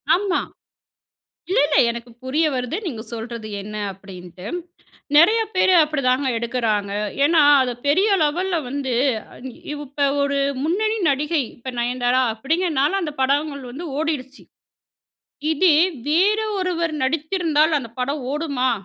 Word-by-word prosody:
ஆமா. 380 -1 0 1.1
இல்ல, 380 - +3
இல்ல 295 - +2
எனக்கு 235 +1 -7
புரிய 300 +5 +1
வருது. 250 +6 -2
நீங்க 230 -8 -4
சொல்றது 230 -1 -6
என்ன 210 +1 -9 0.2
அப்பிடின்ட்டு. 185 -1 -11 0.7
நிறைய 430 +9 +6
பேர் 370 0 +4
அப்பிடிதாங்க 275 -3 +1
எடுக்கறாங்க. 225 -4 -1 0.3
ஏன்னா, 320 0 +5 0.2
அது 250 -1 -1 0.2
பெரிய 380 +9 +3
லெவல்ல 350 +4 0
வந்து, 265 -2 -2 0.4
அ - - -14
இ - - -13 0.2
இப்போ 285 -1 -2 0.2
ஒரு 280 0 0 0.3
முன்னணி 430 +7 0
நடிகை 295 +2 +1
இப்ப 255 +1 -7
நயன்தாரா 245 +1 +1
அப்பிடிங்கிறனால 315 - 0
அந்த 300 -3 -3
படங்கள் 280 +1 0
வந்து 325 +7 -7
ஓடிடுச்சு. 280 -4 -3 1.1
இதே 315 0 +4 0.3
வேற 390 +8 +3 0.2
ஒருவர் 340 -4 -1
நடித்திருந்தால் 315 +1 +1
அந்த 235 -4 -7
படம் 280 +2 -2
ஓடுமா! 280 -5 0
285 Hz, 125 wpm, -21 LUFS, 250-330 Hz, 1.1 s, நிறைய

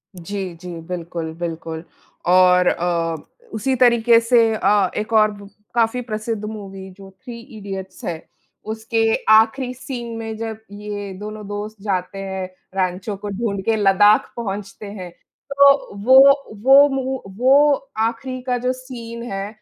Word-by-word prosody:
जी, 185 0 -5
जी, 175 0 -8
बिल्कुल, 170 -1 -5
बिल्कुल 165 -1 -5 0.4
और 180 0 +5
अ, 170 -1 0 0.4
उसी 260 +5 0
तरीके 235 -2 +5
से 230 -1 +3
अ, 205 -3 +2
एक 215 +2 -3
और 215 -1 +5
ब 200 -1 -12 0.3
काफ़ी 235 +1 +1
प्रसिद्ध 220 -2 -4
मूवी, 195 -3 -8
जो 195 +1 -14
थ्री 240 -2 -8 0.2
इडियट्स 195 -2 -8
है, 165 -2 -5 0.4
उसके 225 +1 0 0.2
आखिरी 225 +4 +4
सीन 240 -2 -7
में 225 -1 -5
जब 220 -1 -5
ये 205 -1 -6
दोनों 210 0 -7
दोस्त 205 0 -6
जाते 195 -1 -2
हैं, 190 -1 -4 0.3
रैंचो 190 +2 -2
को 205 +1 -7
ढूँढके 200 0 -1
लद्दाख 205 0 +4
पहुँचते 205 -2 -6
हैं, 185 -4 -8 0.4
तो 280 -5 +4
वो 260 +1 +7 0.5
वो 275 +2 +8
मू 265 -1 -2 0.2
वो 280 +4 +5 0.3
आखिरी 255 +3 -4
का 250 -1 -1
जो 250 +1 -1
सीन 235 -3 -9
है 195 0 -3
210 Hz, 140 wpm, -20 LUFS, 190-235 Hz, 0.5 s, वो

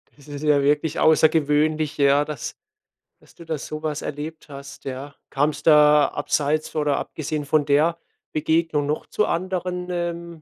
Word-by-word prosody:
Das 145 0 -19
ist 145 +1 -7
ja 145 -2 +3
wirklich 150 +2 +1
außergewöhnlich, 155 -1 +2
ja 140 +1 +4
dass 150 -5 -6 0.7
dass - - -23
du 170 - -12
da 160 -1 -3
so 155 +2 -7
was 150 -1 -2
erlebt 155 +2 -6
hast, 140 0 -11
ja. 135 +2 -6 0.2
Kam's 145 +1 0
da 150 -1 +6
abseits 150 +2 -1
oder 150 -2 +1
abgesehen 155 -1 -4
von 145 0 +2
der 150 +4 +2 0.4
Begegnung 160 -1 +1
noch 150 +1 -2
zu 210 - 0
anderen, 180 0 -3
ähm 170 -1 -3
150 Hz, 155 wpm, -23 LUFS, 145-160 Hz, 0.7 s, da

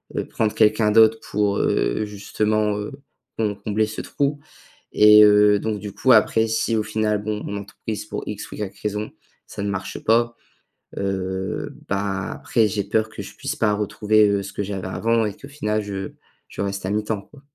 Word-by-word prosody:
heu, - - -1
prendre, 110 -2 0
heu, - - -20
quelqu'un 110 0 +3
d'autre 110 0 +6
pour, 105 -1 +1
heu, 110 - +1
justement, 105 +1 -1
heu, 105 - -5 0.5
com 105 -2 0
combler 110 +1 +1
ce 110 - -5
trou. 145 +1 -1 0.5
Et 105 0 +8
heu, 105 0 +6
donc 110 -1 -2
du 105 0 -6
coup, 130 - +2
après, 110 0 +4
si 115 +1 0
au - - +2
final, 105 -1 -1
bon, 105 0 -3
mon 100 - -4
entreprise, 105 +1 -6
pour - - -5
X 105 - -6
ou - - -7
Y 105 -2 -6
raison, 105 0 -3 0.4
ça - - -7
ne 100 - -1
marche 95 -2 -4
pas, 115 +1 +2 0.6
heu, 95 -1 -3 0.2
bah, 100 -1 -2
après, 115 -3 +1
j'ai 100 0 -1
peur 110 +2 0
que - - -8
je - - -11
puisse - - -4
pas 105 -2 +2
retrouver, 105 +1 +2
heu, 100 -1 0
ce 95 - -8
que 105 - -2
j'avais 95 -2 -4
avant 115 +3 +1
et 105 - -3
qu'au 140 - -11
final 110 -7 -1
je 95 -1 -5 0.4
je - - -6
reste 100 -1 -3
à - - -1
mi-temps, 105 -1 -1
quoi. 145 - -18
105 Hz, 200 wpm, -22 LUFS, 100-110 Hz, 0.6 s, Et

